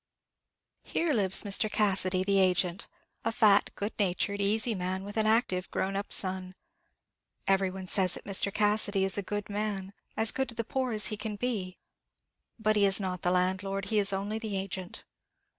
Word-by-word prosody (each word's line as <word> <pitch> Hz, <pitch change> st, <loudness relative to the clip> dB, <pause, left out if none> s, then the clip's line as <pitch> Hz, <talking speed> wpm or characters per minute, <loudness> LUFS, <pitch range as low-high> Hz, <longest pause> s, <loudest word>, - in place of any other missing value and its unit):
Here 330 Hz, -2 st, -1 dB
lives 195 Hz, -5 st, +3 dB
Mr. 205 Hz, +1 st, 0 dB
Cassidy, 190 Hz, -3 st, +1 dB
the 195 Hz, 0 st, +2 dB
agent; 180 Hz, -1 st, +1 dB, 0.4 s
a 225 Hz, -, 0 dB
fat, 215 Hz, -3 st, +4 dB
good 205 Hz, +2 st, -4 dB
natured, 200 Hz, +1 st, 0 dB
easy 220 Hz, +3 st, +1 dB
man, 185 Hz, 0 st, -3 dB
with 205 Hz, +1 st, -8 dB
an 220 Hz, -1 st, +1 dB
active 215 Hz, -5 st, +1 dB
grown 195 Hz, +1 st, -2 dB
up 200 Hz, +1 st, -4 dB
son. 185 Hz, -1 st, +3 dB, 0.9 s
Every 195 Hz, -1 st, +2 dB
one 190 Hz, 0 st, -7 dB
says 185 Hz, -1 st, +1 dB
that -, -, -8 dB
Mr. 200 Hz, 0 st, +2 dB
Cassidy 210 Hz, -1 st, +1 dB
is 195 Hz, +1 st, 0 dB
a -, -, -1 dB
good 205 Hz, +1 st, -4 dB
man, 205 Hz, -2 st, -3 dB, 0.2 s
as 220 Hz, 0 st, +4 dB
good 265 Hz, -1 st, -2 dB
to 235 Hz, -, -10 dB
the 230 Hz, -, -2 dB
poor 255 Hz, +2 st, -2 dB
as 215 Hz, -1 st, 0 dB
he 215 Hz, -, -3 dB
can 210 Hz, 0 st, -4 dB
be. 205 Hz, -5 st, -3 dB, 0.8 s
But 215 Hz, -1 st, +1 dB
he 205 Hz, -, +4 dB
is 195 Hz, 0 st, +5 dB
not 185 Hz, -2 st, -4 dB
the 175 Hz, -, +1 dB
landlord, 190 Hz, +2 st, 0 dB
he 215 Hz, -, +4 dB
is 200 Hz, -1 st, +3 dB
only 200 Hz, +3 st, -3 dB
the 215 Hz, -3 st, -4 dB
agent. 190 Hz, -1 st, -6 dB
200 Hz, 185 wpm, -29 LUFS, 190-215 Hz, 0.9 s, is